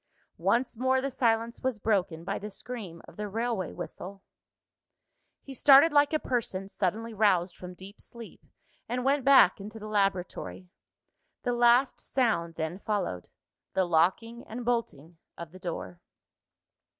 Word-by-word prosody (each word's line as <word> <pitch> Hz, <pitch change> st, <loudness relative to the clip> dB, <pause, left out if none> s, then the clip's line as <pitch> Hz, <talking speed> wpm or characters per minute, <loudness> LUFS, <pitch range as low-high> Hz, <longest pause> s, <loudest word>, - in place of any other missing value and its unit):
Once 240 Hz, 0 st, +1 dB
more 260 Hz, +1 st, +2 dB
the 275 Hz, +1 st, -3 dB
silence 230 Hz, -2 st, 0 dB
was 260 Hz, -3 st, -1 dB
broken 185 Hz, -6 st, 0 dB
by -, -, -3 dB
the 210 Hz, -, -6 dB
scream 205 Hz, -7 st, -8 dB
of -, -, -15 dB
the 210 Hz, 0 st, -3 dB
railway 225 Hz, -3 st, -2 dB
whistle. 185 Hz, +2 st, -8 dB, 1.2 s
He 275 Hz, -, -9 dB
started 280 Hz, +4 st, +7 dB
like 290 Hz, 0 st, +5 dB
a 310 Hz, -, +2 dB
person 205 Hz, -9 st, -3 dB
suddenly 210 Hz, +4 st, -2 dB
roused 195 Hz, -4 st, +2 dB
from 180 Hz, 0 st, -10 dB
deep 195 Hz, +3 st, -13 dB
sleep, 235 Hz, -2 st, -11 dB, 0.5 s
and 250 Hz, +1 st, -2 dB
went 275 Hz, 0 st, +2 dB
back 260 Hz, -8 st, +6 dB
into 215 Hz, +3 st, -8 dB
the 215 Hz, -, -9 dB
laboratory. 195 Hz, -3 st, -2 dB, 0.7 s
The 245 Hz, -, 0 dB
last 240 Hz, +2 st, +4 dB
sound 205 Hz, -10 st, 0 dB
then 160 Hz, +3 st, -4 dB
followed 200 Hz, -, -3 dB, 0.4 s
the 190 Hz, -, +2 dB
locking 190 Hz, +8 st, +1 dB
and 235 Hz, +2 st, -6 dB
bolting 175 Hz, -, -3 dB, 0.2 s
of 170 Hz, -2 st, -8 dB
the 185 Hz, -, -13 dB
door. 90 Hz, -, -6 dB
215 Hz, 145 wpm, -28 LUFS, 180-245 Hz, 1.2 s, started